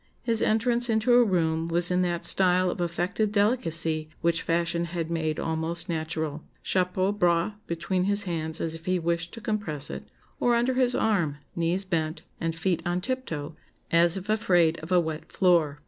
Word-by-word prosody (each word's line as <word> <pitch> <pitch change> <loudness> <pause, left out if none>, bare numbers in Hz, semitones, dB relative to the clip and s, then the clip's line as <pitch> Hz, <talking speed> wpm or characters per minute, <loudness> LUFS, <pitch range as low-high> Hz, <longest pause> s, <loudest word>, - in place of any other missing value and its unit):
His 230 -2 +1
entrance 235 +2 +2
into 225 +2 +2
a 245 0 +7
room 165 -5 0
was 175 +1 +3
in 180 0 +2
that 175 -1 -1
style 185 -1 +4
of - - -5
affected 175 +5 -1
delicacy 165 -8 +1
which 170 -1 +1
fashion 170 0 0
had 170 -1 -4
made 160 -2 -1
almost 160 +2 -2
natural 160 -2 -3 0.2
chapeau 185 +1 +1
bras 175 -1 +1
between 180 +2 -1
his 205 +1 +1
hands 160 -3 -3
as 160 - -2
if 165 0 -9
he 185 0 +1
wished 170 0 -2
to 230 - -9
compress 205 - -3
it, 70 0 -7 0.3
or 240 -1 +3
under 240 +2 +1
his 250 -1 +2
arm, 175 -10 +1 0.2
knees 175 +3 -1
bent, 160 -3 -2 0.2
and 165 -1 -2
feet 170 0 0
on 175 0 -1
tiptoe, 180 - -4 0.4
as 170 +1 +4
if 190 +1 -7
afraid 175 -7 +2
of 160 +3 -9
a 180 - +5
wet 160 -2 -4
floor. 170 -6 +2
175 Hz, 180 wpm, -26 LUFS, 165-200 Hz, 0.4 s, a